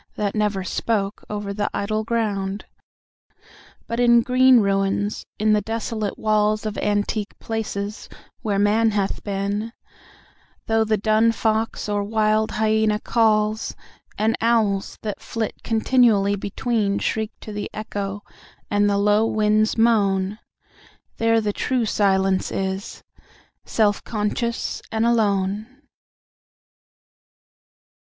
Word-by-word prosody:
That 205 -1 -1
never 210 -3 0
spoke, 200 +1 -2
over 205 -1 -4
the 205 0 -1
idle 215 +2 -1
ground: 205 -3 -2 1.2
But 230 +1 -4
in 235 -1 +5
green 255 0 +5
ruins, 195 0 0
in 215 0 +2
the 210 - +3
desolate 220 -1 -3
walls 215 0 +1
Of 215 -1 -3
antique 205 0 -1
palaces, 210 -2 -4 0.3
where 205 -3 -1
Man 210 +3 +3
hath 205 -2 -2
been, 200 +2 -2 0.9
Though 225 0 +2
the 215 0 +1
dun 215 +2 +3
fox, 225 -1 -1
or 205 -1 0
wild 215 +1 +1
hyæna, 215 -1 +1
calls, 215 -2 +1 0.4
And 220 +2 +1
owls, 220 -4 +1
that 210 -2 -4
flit 225 -2 -4
continually 220 -3 +3
between, 205 0 -1
Shriek 220 -1 -1
to 215 - -8
the 205 0 -4
echo, 205 -1 -5 0.5
and 205 0 +3
the 200 - +1
low 210 +2 +3
winds 215 0 +2
moan,— 205 -3 +2 0.8
There 225 0 +3
the 210 -2 -1
true 250 +1 0
Silence 195 -2 +1
is, 190 +1 -4 0.6
self 210 -2 +1
conscious 230 +2 -2
and 225 0 +1
alone. 205 -3 +1
215 Hz, 115 wpm, -22 LUFS, 205-225 Hz, 1.2 s, in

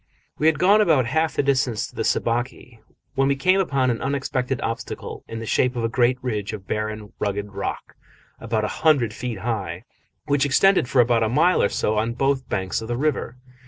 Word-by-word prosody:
We 155 - +3
had 160 -2 +3
gone 200 +6 +5
about 155 - +3
half 160 +6 0
the - - +1
distance 130 -5 +1
to - - -13
the - - -2
Sabaki 120 0 -2 0.3
when 135 0 +2
we 140 - +2
came 185 +8 +3
upon 140 -8 +1
an 115 - -3
unexpected 135 -1 -2
obstacle 115 - -5
in 115 - -6
the 115 - -5
shape 125 +3 +1
of 120 - -2
a 115 - +1
great 125 +1 +2
ridge 105 -4 -3
of 100 -3 -7
barren, 110 0 -4
rugged 100 0 -2
rock, - - -5 0.5
about 110 -1 -1
a 105 - -5
hundred 135 -9 +3
feet 120 -1 -5
high, 95 -6 -3 0.4
which 145 -1 +2
extended 145 +1 +3
for 130 - +5
about 120 -1 +2
a 110 - +1
mile 165 +9 +3
or 100 - +2
so 105 0 0
on 115 +2 -1
both 135 0 0
banks 95 +3 -2
of 110 - -7
the 120 0 -2
river. 130 -3 -1
125 Hz, 205 wpm, -23 LUFS, 110-140 Hz, 0.5 s, gone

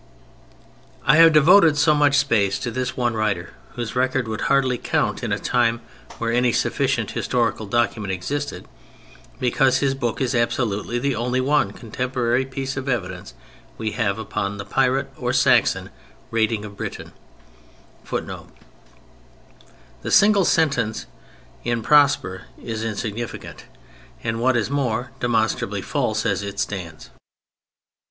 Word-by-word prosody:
I 150 +4 +5
have 165 0 +8
devoted 160 +1 +6
so 150 +1 +4
much 145 -1 +3
space 110 -8 +2
to 120 - -4
this 125 +1 -3
one 120 -2 +1
writer, 105 -6 -2 0.2
whose 120 -1 -5
record 130 -1 0
would 110 0 -4
hardly 130 -3 +2
count - - -1
in - - -3
a - - +1
time 115 0 +1 0.4
where 115 0 -1
any 120 +1 +2
sufficient - - 0
historical 115 -3 -1
document 110 -2 0
existed, 95 +2 -4 0.7
because 130 +1 +2
his 135 -1 +1
book 120 -4 -3
is 130 -1 0
absolutely 120 -2 0
the 135 +3 0
only 125 +2 -1
one 140 -4 +2
contemporary 125 +2 -1
piece 135 0 -4
of 135 +1 -3
evidence 125 -3 -4 0.4
we 110 -1 -3
have 105 -3 -1
upon 105 -2 -3
the 100 - -6
pirate, 135 0 +1
or - - -2
Saxon, - - +3 0.4
raiding 110 -1 0
of 100 -1 -10
Britain. - - -6 0.9
[Footnote: - - -5 1.5
The - - -5
single 205 -1 +5
sentence 140 -11 +1 0.6
in 120 -1 -1
Prosper 145 -10 +3
is 110 -1 -5
insignificant—and 115 - -6
what 130 0 +3
is 115 +3 -1
more, 125 -3 -1
demonstrably 115 -2 0
false - - -1
as - - 0
it 100 0 -6
stands. 85 -6 -5
120 Hz, 130 wpm, -22 LUFS, 110-135 Hz, 1.5 s, have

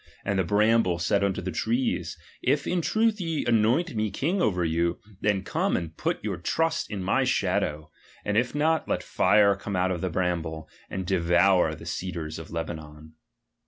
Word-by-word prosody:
And 100 -1 0
the - - +3
hramhle 105 -1 +3
said 100 +3 +1
unto 95 -2 -1
the 95 - -3
trees, 115 +9 -1 0.2
If - - +1
in 180 -1 0
truth 220 +3 +1
ye 165 -3 -2
anoint 120 +8 +2
me 110 0 0
king 165 - -1
over 90 - +1
you, 85 +1 0 0.2
then 100 -2 +1
come - - 0
and 80 -2 -5
put - - -2
your - - -2
trust 165 0 -1
in 100 -3 -4
my 90 - +2
shadow; 75 +1 0 0.3
and 100 - -1
if 125 +5 +1
not, 155 +2 +1
let - - 0
fire 100 -1 +4
come 100 0 -5
out 90 +1 +1
of 85 -3 -3
the 95 - -1
bramble, 80 -3 -2 0.2
and 95 0 -4
devour 90 +1 +3
the - - -12
cedars 80 -4 -4
of 80 - -9
Lebanon. 80 -2 -7
95 Hz, 180 wpm, -26 LUFS, 85-115 Hz, 0.3 s, fire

